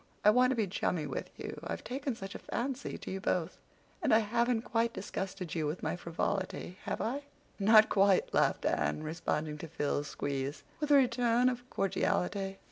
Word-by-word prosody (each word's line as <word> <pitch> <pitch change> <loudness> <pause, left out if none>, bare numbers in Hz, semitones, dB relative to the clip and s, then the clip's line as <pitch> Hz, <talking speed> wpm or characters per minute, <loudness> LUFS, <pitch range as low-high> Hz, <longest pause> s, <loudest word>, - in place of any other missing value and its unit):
I 210 - +9
want 250 +3 +5
to 260 - +1
be 225 -3 +1
chummy 180 -4 -1
with 140 - -4
you. - - -6
I've - - -4
taken 265 0 -3
such 195 -2 -7
a - - -7
fancy 260 +1 -3
to - - -7
you 190 0 -4
both. 180 -2 -1 0.4
And 300 - +1
I 220 - +8
haven't 235 +1 +1
quite 230 -1 0
disgusted 190 -3 -4
you 160 -3 0
with 155 +5 -4
my - - 0
frivolity, 185 +2 -3
have - - -2
I?" 265 +6 -1 0.4
"Not 215 +2 +7
quite," 195 -1 +3
laughed - - +2
Anne, 75 - 0
responding 155 -1 -2
to 165 - -6
Phil's 145 -2 -1
squeeze, 140 0 -3 0.2
with 300 -1 -1
a 290 - +7
return 245 -2 +4
of 245 0 -5
cordiality. 195 0 0
195 Hz, 185 wpm, -32 LUFS, 165-235 Hz, 0.4 s, I